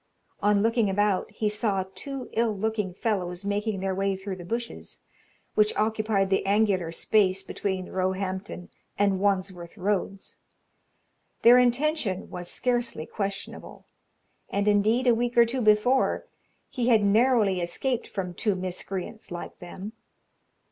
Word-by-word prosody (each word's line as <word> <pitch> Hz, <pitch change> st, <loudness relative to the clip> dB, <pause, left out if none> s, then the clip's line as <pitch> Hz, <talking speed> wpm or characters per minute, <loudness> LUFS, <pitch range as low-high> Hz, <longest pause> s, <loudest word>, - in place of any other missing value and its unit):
On 205 Hz, 0 st, +3 dB
looking 225 Hz, -2 st, +2 dB
about, 205 Hz, 0 st, +1 dB
he 215 Hz, 0 st, -2 dB
saw 210 Hz, -2 st, 0 dB
two 270 Hz, +6 st, -6 dB
ill 225 Hz, -2 st, +1 dB
looking 210 Hz, -2 st, -1 dB
fellows 185 Hz, -2 st, -2 dB
making 205 Hz, 0 st, -1 dB
their 190 Hz, 0 st, -1 dB
way 195 Hz, +1 st, 0 dB
through 190 Hz, 0 st, -6 dB
the 175 Hz, -, -8 dB
bushes, 235 Hz, +6 st, -5 dB, 0.5 s
which 210 Hz, 0 st, +3 dB
occupied 215 Hz, -2 st, +1 dB
the 195 Hz, -, +2 dB
angular 195 Hz, -4 st, +2 dB
space 195 Hz, +1 st, +2 dB
between 190 Hz, -1 st, -3 dB
Roehampton 190 Hz, 0 st, -2 dB, 0.3 s
and 200 Hz, -2 st, +2 dB
Wandsworth 185 Hz, -2 st, -1 dB
roads. 195 Hz, 0 st, -2 dB, 1.1 s
Their 245 Hz, +2 st, +8 dB
intention 250 Hz, -, +1 dB
was 175 Hz, -1 st, -6 dB
scarcely 240 Hz, -9 st, -1 dB
questionable, 200 Hz, +2 st, -5 dB, 0.6 s
and, 200 Hz, +1 st, -1 dB
indeed, 215 Hz, +5 st, +3 dB
a 245 Hz, -, +6 dB
week 240 Hz, +1 st, -1 dB
or 235 Hz, -, +8 dB
two 250 Hz, +2 st, -2 dB
before, 215 Hz, +4 st, +3 dB, 0.4 s
he 245 Hz, -3 st, -2 dB
had 225 Hz, -4 st, +5 dB
narrowly 210 Hz, -3 st, +3 dB
escaped 235 Hz, +8 st, -1 dB
from 180 Hz, -3 st, -4 dB
two 205 Hz, +3 st, 0 dB
miscreants 185 Hz, +3 st, -5 dB
like 175 Hz, 0 st, -7 dB
them. 190 Hz, +4 st, -8 dB
205 Hz, 135 wpm, -26 LUFS, 190-225 Hz, 1.1 s, Their